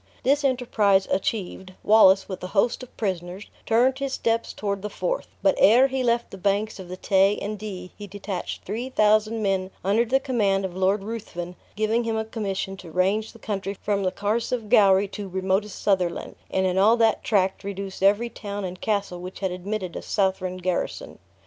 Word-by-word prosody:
This 285 +2 +2
enterprise 220 -7 +2
achieved, 190 -1 -2
Wallace, 195 -3 +6
with 190 -2 -7
a - - -3
host 235 +6 +2
of 255 - -12
prisoners, 185 -1 -4 0.2
turned 250 +4 +3
his 275 -1 -2
steps 230 -2 0
toward 200 -2 -3
the 210 - -4
Forth; - - -3 0.2
but 290 - +5
ere 240 +6 +7
he 265 0 -1
left 235 -1 0
the 195 - -9
banks 205 +3 0
of 185 - -8
the 185 - -6
Tay 195 +2 +3
and 210 +1 -4
Dee, 185 -4 -7
he 205 - -9
detached 195 -1 -5
three 230 +6 -4
thousand 215 -1 +2
men 190 -2 0
under 205 +5 +3
the 255 +3 +2
command 205 -8 +1
of 180 -2 -6
Lord 190 +2 +1
Ruthven, 195 -5 -6 0.2
giving 215 +3 +1
him 225 -1 -1
a 220 - -1
commission 195 -3 -3
to 185 -3 -11
range 195 +6 0
the - - -15
country 200 -1 -4
from 205 -1 -1
the 185 - +1
Carse 210 +5 -1
of 230 -4 -2
Gowrie 195 -1 +5
to 200 -1 -6
remotest 190 +2 -1
Sutherland, 185 -4 0
and 190 0 0
in 185 0 +1
all 220 +4 +5
that 225 -1 +2
tract 195 -2 +1
reduce 195 -1 -6
every 205 +5 +3
town 205 -2 -5
and 180 0 -7
castle 200 -4 -1
which 185 +1 -8
had 190 -2 0
admitted 185 0 -4
a - - -4
Southron 190 -2 -1
garrison. 180 -1 -3
200 Hz, 195 wpm, -24 LUFS, 190-220 Hz, 0.2 s, ere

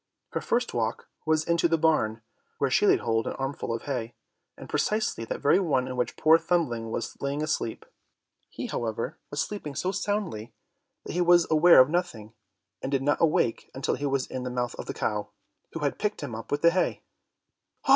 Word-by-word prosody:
Her - - -2
first 240 +1 0
walk 115 -1 -2 0.2
was 155 0 +3
into 170 +1 +2
the 165 0 +2
barn, 115 -9 +1 0.3
where - - 0
she - - +4
laid - - +4
hold 115 -1 0
of - - -2
an - - -10
armful 135 -2 -3
of 115 - -3
hay, 120 -5 -4 0.4
and - - -10
precisely 215 - 0
that - - -5
very 145 +6 +4
one 135 -9 +1
in 130 - -4
which 125 -1 -2
poor 160 +1 +6
Thumbling 120 -12 0
was - - -5
lying 140 +2 -1
asleep. 155 -7 -2 0.6
He, - - -6
however, 115 -1 -3
was 145 -1 -1
sleeping 155 -9 -5
so 185 - -1
soundly 195 - -3 0.5
that - - -6
he 180 - +1
was 175 -1 +5
aware 165 +3 +7
of 130 +2 +7
nothing, 120 -12 -2 0.5
and 135 - -3
did 135 -1 +1
not 145 +1 +1
awake 155 -8 +2
until 135 - -1
he 145 - -2
was 135 -1 0
in 130 - -5
the 125 - -3
mouth 125 -1 -2
of - - -6
the - - -4
cow, - - -2 0.4
who 165 - -5
had 145 -1 -1
picked 210 0 -1
him 135 -5 -5
up 110 +1 -7
with 145 +2 -1
the 170 - +7
hay. 180 0 0
145 Hz, 205 wpm, -27 LUFS, 120-170 Hz, 0.6 s, aware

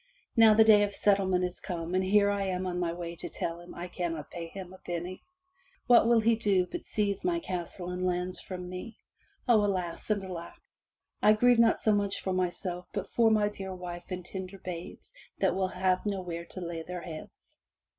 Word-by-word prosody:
Now 225 -2 +7
the 220 - +8
day 215 -2 +7
of 205 -1 +1
settlement 190 -3 +2
is 180 0 -5
come 170 -2 -4
and 185 0 +2
here 200 +1 +4
am 190 -2 -1
I - - -1
on 180 - -3
my 175 -2 0
way 170 0 -5
to - - -6
tell 165 0 -3
him 175 +1 -12
I 175 +1 -5
cannot 170 -4 -4
pay 170 -1 -5
him 185 +1 -9
a 185 - -13
penny. 175 +1 -5 0.6
What 240 -2 +6
will 235 -1 +5
he 230 +1 +4
do 200 -5 +2
but 180 - -6
seize 205 -2 -1
my 350 -1 +1
castle 180 - -5
and 180 0 -3
lands 180 0 -1
from 180 -1 -6
me. 185 +5 -7 0.5
O, 225 -4 +5
alas 185 -3 -2
and 205 -2 +1
alack! 175 -3 -7 0.7
I 215 - +7
grieve 245 +2 +4
not 230 -1 +5
so 215 - +2
much 200 -1 0
for 190 - -2
myself 180 0 -2
but 200 -1 -3
for 230 -1 +4
my 215 -1 +3
dear 190 -2 -6
wife 175 -1 -7
and 180 -1 -5
tender 190 +1 -6
babes 180 - -7 0.2
that - - +2
will 190 -1 0
have 185 0 +1
nowhere 180 -5 -3
to 185 - -8
lay 170 -1 -4
their 180 +2 -6
heads. 160 -3 -10
185 Hz, 205 wpm, -30 LUFS, 175-205 Hz, 0.7 s, the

